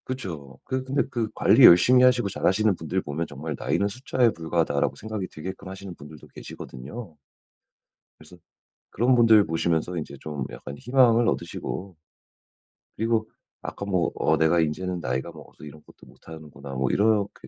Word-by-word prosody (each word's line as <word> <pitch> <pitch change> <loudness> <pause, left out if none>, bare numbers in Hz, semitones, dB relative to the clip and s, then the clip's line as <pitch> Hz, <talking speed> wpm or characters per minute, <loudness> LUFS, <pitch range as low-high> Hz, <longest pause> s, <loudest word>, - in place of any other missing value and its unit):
그쵸. 85 - -7
그 130 0 -3
근데 135 +2 0
그 115 -3 -2
관리 - - +5
열심히 125 +9 +7
하시고 125 -4 +4
잘하시는 100 +2 +1
분들 90 +3 -3
보면 80 +2 -4
정말 75 +2 -6
나이는 100 - 0
숫자에 120 +2 +1
불과하다라고 80 -3 -1
생각이 110 -3 -5
들게끔 95 +4 -8
하시는 95 0 -8
분들도 75 0 -13
계시거든요. 80 - -10 1.0
그래서 80 +4 -16 0.5
그런 125 +4 +2
분들 110 -4 +6
보시면서 80 +1 -1
인제 80 - -6
좀 75 -4 -5
약간 70 - -9
희망을 120 - +3
얻으시고 95 -1 -4 1.0
그리고 110 0 0 0.3
아까 100 - -6
뭐 90 -4 0
"어 80 - +1
내가 80 +2 +3
인제는 90 +3 -1
나이가 65 +5 -3
먹어서 75 -2 -15
이런 75 0 -11
것도 - - -18
못하는구나." 75 -4 -12
뭐 65 -1 -1
이렇게 105 -1 0
90 Hz, 365 characters per minute, -25 LUFS, 80-110 Hz, 1.0 s, 열심히